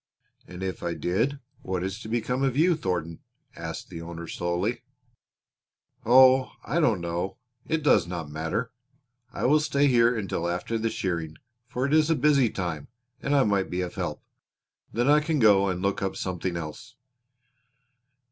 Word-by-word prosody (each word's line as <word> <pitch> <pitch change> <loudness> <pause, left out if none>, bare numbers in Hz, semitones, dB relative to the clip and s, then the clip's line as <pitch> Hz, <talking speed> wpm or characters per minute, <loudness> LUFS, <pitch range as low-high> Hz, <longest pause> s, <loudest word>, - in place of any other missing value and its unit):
"And 90 +1 -8
if 95 -3 -4
I 85 -1 -2
did 115 +11 0 0.2
what 90 -1 -3
is 95 +3 -4
to 110 - -8
become 120 +3 -1
of 135 -1 +1
you, 170 +3 +4
Thornton?" 90 - -3 0.4
asked - - -6
the 85 - -7
owner 85 0 -7
slowly. 90 +9 -2 1.3
"Oh, 130 +1 +6
I 150 +8 0
don't 115 - +2
know. 85 +3 -3 0.3
It 160 -1 -1
does 115 - +4
not 85 -3 -5
matter. 80 +10 -3 0.6
I - - -3
will 150 +4 +5
stay 145 -1 +1
here 120 -3 +4
until 90 -4 -2
after 90 +6 -2
the 115 +1 0
shearing, 85 -6 -3 0.3
for 125 +2 -2
it 140 - 0
is 155 0 +4
a 165 - +4
busy 140 -3 +3
time 85 -7 -4 0.3
and 145 +1 0
I 140 - +5
might 100 -3 +1
be 90 +1 -2
of 90 -1 -4
help. - - -4 0.7
Then 120 +3 0
I 150 +1 +6
can 155 +1 -1
go 100 -5 +5
and 90 0 -3
look 100 0 0
up 95 -1 -2
something 90 -1 -3
else." 85 +10 -8
105 Hz, 170 wpm, -26 LUFS, 90-130 Hz, 1.3 s, Oh